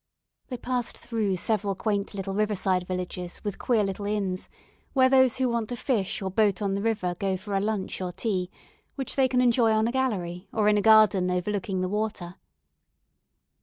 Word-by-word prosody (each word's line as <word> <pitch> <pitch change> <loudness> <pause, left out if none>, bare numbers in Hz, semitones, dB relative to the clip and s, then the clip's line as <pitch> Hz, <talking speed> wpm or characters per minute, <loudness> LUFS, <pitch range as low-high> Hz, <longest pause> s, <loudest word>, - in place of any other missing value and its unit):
They 250 - -5
passed 245 0 -3
through 220 -5 -1
several 200 +1 0
quaint 205 0 -2
little 195 0 -4
riverside 190 -3 0
villages 180 -1 -5
with 205 -3 -4
queer 230 -4 +2
little 200 +1 -3
inns, 195 -3 -2 0.4
where 260 -1 +5
those 260 -2 +4
who 260 -1 +1
want 235 -2 -1
to 245 - -3
fish 220 -6 -1
or 190 - -2
boat 205 -2 +2
on 200 -2 -1
the 200 - -1
river 210 -5 0
go 190 -1 0
for 200 +2 -7
a 195 - +2
lunch 205 -2 -2
or 180 -1 -3
tea, 185 -2 -2 0.5
which 270 -3 -4
they 265 -1 +4
can 250 -1 +2
enjoy 235 -2 +4
on 220 +1 +2
a - - 0
gallery, 195 -9 -2
or 215 -2 +1
in 210 0 +4
a - - +1
garden 215 -4 +5
overlooking 185 +1 -1
the 185 - 0
water. 205 -3 -3
205 Hz, 190 wpm, -26 LUFS, 190-225 Hz, 0.5 s, where